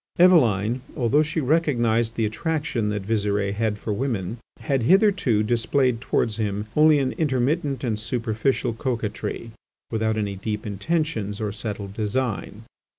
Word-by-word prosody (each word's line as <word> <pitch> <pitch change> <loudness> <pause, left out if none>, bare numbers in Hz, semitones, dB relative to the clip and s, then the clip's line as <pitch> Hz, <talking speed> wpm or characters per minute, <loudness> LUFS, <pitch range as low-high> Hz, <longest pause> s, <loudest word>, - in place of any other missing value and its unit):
Eveline, 125 - +4 0.2
although 130 +4 +3
she 155 +1 -1
recognised 120 -7 +1
the 115 - +1
attraction 135 -1 -1
that 105 -1 -2
Visire 100 -2 0
had 110 0 -1
for 105 0 -3
women, 115 -3 -2 0.2
had 135 -3 0
hitherto 185 - +3
displayed 120 +2 +1
towards 115 -3 0
him 105 -1 -2
only 155 0 +6
an 135 -2 0
intermittent 140 -1 0
and 110 -4 -1
superficial 115 +2 -1
coquetry, 115 -2 -3 0.4
without 110 -1 0
any 100 -2 -2
deep 105 +2 -4
intentions 110 - -2
or 105 -2 -2
settled 105 -2 -5
design. 110 0 -2
115 Hz, 135 wpm, -24 LUFS, 105-135 Hz, 0.4 s, only